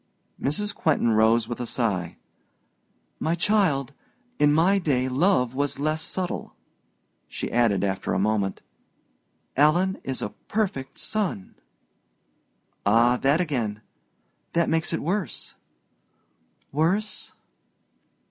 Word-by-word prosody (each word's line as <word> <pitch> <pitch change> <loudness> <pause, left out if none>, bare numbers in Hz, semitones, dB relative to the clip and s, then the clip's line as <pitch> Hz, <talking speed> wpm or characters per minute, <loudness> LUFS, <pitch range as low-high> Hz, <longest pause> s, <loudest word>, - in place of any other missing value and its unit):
Mrs. 205 +10 -1
Quentin 145 -7 +2
rose 110 +1 +4
with 120 0 -5
a 120 - -3
sigh. 100 -9 -1 1.0
"My 165 +2 0
child, 165 - +1 0.5
in 145 0 +5
my 175 +6 +4
day 130 -7 +1
love 130 -2 +2
was 140 +1 -1
less 155 +2 -1
subtle." 180 +2 -4 0.7
She - - -5
added, 115 -5 +2
after 95 -1 -1
a - - +1
moment, 100 -1 0 0.9
"Alan 175 +7 +3
is 130 -1 -3
a 105 - -3 0.2
perfect 200 -12 -2
son." 190 - -2 1.3
"Ah, 115 +4 +4
that 140 +5 +2
again 115 -11 -2 0.7
that 170 -1 +2
makes 160 0 +1
it 165 - -2
worse!" 175 - -3 1.2
"Worse?" 180 +9 -1
140 Hz, 110 wpm, -25 LUFS, 115-170 Hz, 1.3 s, in